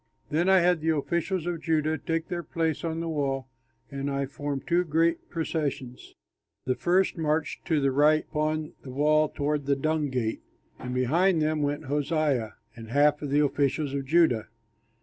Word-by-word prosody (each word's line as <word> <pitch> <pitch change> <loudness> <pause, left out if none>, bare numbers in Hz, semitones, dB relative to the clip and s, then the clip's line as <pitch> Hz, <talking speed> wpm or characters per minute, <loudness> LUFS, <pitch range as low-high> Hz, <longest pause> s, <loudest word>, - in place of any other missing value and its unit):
Then 170 +5 +2
I 190 -1 +6
had 175 -2 +2
the 160 0 +1
officials 170 +4 -1
of 175 -2 -3
Judah 155 -1 +1
take 165 +2 -3
their 175 -2 -3
place 160 -1 -2
on 165 0 -2
the 165 - -3
wall, 135 -4 -2 0.4
and 140 0 -3
I 140 0 -1
formed 140 0 -5
two 175 +1 +2
great 165 +1 0
processions. 145 -6 -4 0.5
The 130 - +1
first 180 +5 +1
marched 155 0 -1
to 160 -4 +2
the 135 -1 +2
right 150 +3 +3
upon 155 0 -1
the 135 - -10
wall 150 +3 +2
toward 145 -1 -2
the 140 - +3
Dung 155 +1 0
Gate; 120 -4 -2 0.4
and 125 0 -5
behind 165 +8 +2
them 155 0 0
went 145 +2 -2
Hoshaiah 145 -4 0 0.2
and 115 -1 -10
half 145 +3 +3
of 145 - -4
the 145 +2 +3
officials 140 0 0
of 140 -1 -2
Judah. 150 -7 +3
150 Hz, 175 wpm, -27 LUFS, 140-165 Hz, 0.5 s, I